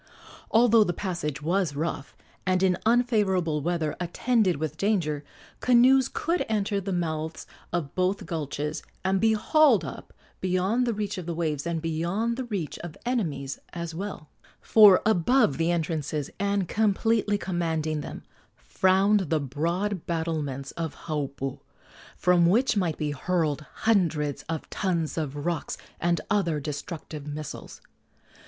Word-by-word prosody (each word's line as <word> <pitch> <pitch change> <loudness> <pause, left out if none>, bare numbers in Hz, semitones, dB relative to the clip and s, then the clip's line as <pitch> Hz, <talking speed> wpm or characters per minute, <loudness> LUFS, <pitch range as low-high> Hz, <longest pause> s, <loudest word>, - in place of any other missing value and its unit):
Although 230 -1 +6
the 175 - -1
passage 165 -6 -3
was 175 -2 0
rough 145 -4 -4 0.3
and 185 0 +1
in 185 -1 +4
unfavorable 205 -10 +2
weather 160 -1 -1
attended 185 - +1
with 155 0 -3
danger, 160 -7 0 0.4
canoes 255 +1 +5
could 340 +3 0
enter 205 -2 0
the 195 +1 -4
mouths 160 -3 -2 0.3
of 160 -5 -2
both 185 +2 0
gulches 150 -2 -3 0.2
and 190 0 +2
be 220 0 +4
hauled 265 - +4
up - - -8 0.3
beyond 190 +7 +1
the 235 - +1
reach 205 -2 -3
of 175 - -8
the 170 - -2
waves, 155 -2 -2
and 165 -1 -2
beyond 175 +9 -1
the 260 +1 -4
reach 195 - -4
of 170 -3 -8
enemies 155 - -2
as 170 -1 -5
well; 180 -3 -6 0.3
for 210 -4 +7
above 215 - +3
the 165 +1 +2
entrances, 155 -4 -1
and 200 -2 0
completely 215 0 +1
commanding 160 -5 -1
them, - - -8 0.3
frowned 190 - +2
the 160 - +2
broad 170 +8 -2
battlements 155 -5 -2
of 165 -2 -4
Haupu, 140 -4 -3 0.6
from 175 -1 +4
which 225 +7 +3
might 175 -6 0
be 150 -1 -1
hurled 155 0 -1 0.2
hundreds 165 -10 +2
of 160 -1 -3
tons 170 -5 -1
of 145 -2 -3
rocks 170 -2 -2 0.2
and 170 -1 +1
other 170 -7 +1
destructive 150 +1 -6
missiles. 150 0 -7
175 Hz, 140 wpm, -27 LUFS, 155-205 Hz, 0.6 s, for